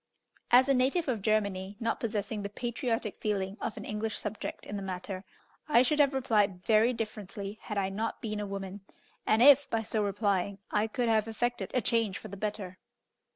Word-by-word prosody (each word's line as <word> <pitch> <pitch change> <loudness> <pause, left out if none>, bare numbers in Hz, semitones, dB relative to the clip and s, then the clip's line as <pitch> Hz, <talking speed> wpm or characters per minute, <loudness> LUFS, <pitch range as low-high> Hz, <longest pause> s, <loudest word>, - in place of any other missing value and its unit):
As 255 +2 +7
a 275 - +4
native 270 +6 +2
of 235 -6 -1
Germany, 200 -2 0
not 230 0 -1
possessing 215 -2 -2
the 200 - -4
patriotic 235 -1 -2
feeling 200 -3 -1
of 215 - -3
an - - -6
English 210 0 -3
subject 210 0 -5
in 205 - -6
the 200 - -3
matter, 190 0 -5 0.5
I 245 -4 +6
should 300 +4 +1
have 280 -2 +4
replied 210 -8 +1
very 225 +2 +5
differently 210 -3 -5
had 210 - -5
I 190 -1 +1
not 215 +4 -3
been 215 -3 -3
a 205 - -3
women, 195 0 -6 0.5
and 220 +2 +5
if, 285 0 +7
by 225 -1 0
so 215 0 -1
replying, 200 -1 0
I 210 +1 +2
could 240 +2 -1
have 220 -1 +3
effected 225 -3 -2
a 250 - +3
change 225 -3 +1
for 215 - -9
the 200 - -7
better. 195 -3 -4
215 Hz, 195 wpm, -30 LUFS, 200-230 Hz, 0.5 s, As